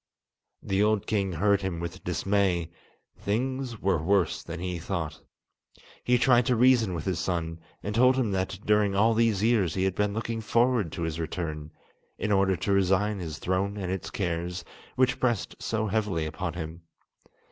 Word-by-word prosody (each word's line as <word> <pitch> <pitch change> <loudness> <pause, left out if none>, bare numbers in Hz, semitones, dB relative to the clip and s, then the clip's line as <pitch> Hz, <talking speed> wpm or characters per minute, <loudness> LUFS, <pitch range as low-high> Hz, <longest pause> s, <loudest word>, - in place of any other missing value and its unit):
The 95 +1 0
old 105 -1 +2
king 100 -3 0
heard 100 +4 +2
him 95 -3 -3
with 85 +2 -6
dismay; 90 -2 0 0.5
things 125 +2 -2
were 95 -4 +1
worse 95 0 +1
than 85 0 -7
he 90 -1 -3
thought. 80 -3 -4 0.8
He 125 0 +3
tried 120 -1 +4
to 125 - +3
reason 115 -5 +4
with 80 - -5
his 90 -3 -1
son, 85 -2 -2 0.2
and 105 - -3
told 125 +3 +5
him 125 -6 0
that 95 -1 -1
during 105 -2 +3
all 110 +3 +4
these 110 -3 +2
years 110 -8 +2
he 95 - 0
had 95 -1 +1
been 105 +1 0
looking 115 0 -3
forward 115 -4 +2
to 85 - -3
his 80 0 -3
return, 80 -2 -4 0.5
in 105 - -2
order 95 -1 +3
to 90 +4 -2
resign 100 +2 +2
his 80 -4 -5
throne 95 +4 -1
and 95 -3 -3
its 95 -1 -4
cares, 90 -4 -3 0.3
which 130 0 +2
pressed 120 -5 0
so 110 -1 -1
heavily 105 -6 0
upon 80 +2 -4
him. 80 0 -6
95 Hz, 175 wpm, -27 LUFS, 85-110 Hz, 0.8 s, told